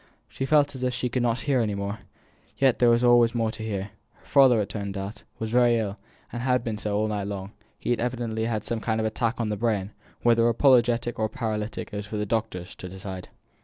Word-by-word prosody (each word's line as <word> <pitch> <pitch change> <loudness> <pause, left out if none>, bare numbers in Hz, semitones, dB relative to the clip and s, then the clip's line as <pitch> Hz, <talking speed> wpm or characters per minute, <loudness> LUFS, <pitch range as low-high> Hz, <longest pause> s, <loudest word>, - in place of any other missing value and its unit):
She 135 - -4
felt 145 -1 +4
as 130 - -7
if 125 -1 0
she 125 0 -1
could 125 +1 -1
not 120 0 +1
hear 140 -3 +1
any 105 -3 0
more; 100 +2 -4 0.6
yet 135 -3 +3
there 120 - +5
was 120 0 +5
more 115 -1 +1
to 110 - -9
hear. 100 -2 -3 0.2
Her - - -27
father, 135 -4 +6
as 105 - +2
it - - -8
turned 100 -2 -4
out, 100 +2 -6 0.2
was 110 0 -4
very 120 -1 +4
ill, 105 -2 -3 0.3
and 120 - -3
had 125 -1 +1
been 110 -3 -3
so 105 0 -1
all 110 +1 +1
night 105 -2 -2
long; 100 -1 -5 0.3
he - - -3
had 120 - +1
evidently 115 -2 -2
had 110 -2 -2
some 115 - -1
kind 110 0 -1
of 110 - 0
attack 115 +2 -1
on 115 -2 0
the 105 - -2
brain, 105 -3 0 0.3
whether 115 0 +4
apoplectic 120 -2 +3
or 110 0 +1
paralytic 110 -2 -3
it - - -3
was 105 0 -5
for 105 - -4
the 105 - -1
doctors 105 -5 -2
to 90 - -7
decide. 95 0 -7
110 Hz, 240 wpm, -26 LUFS, 105-120 Hz, 0.6 s, father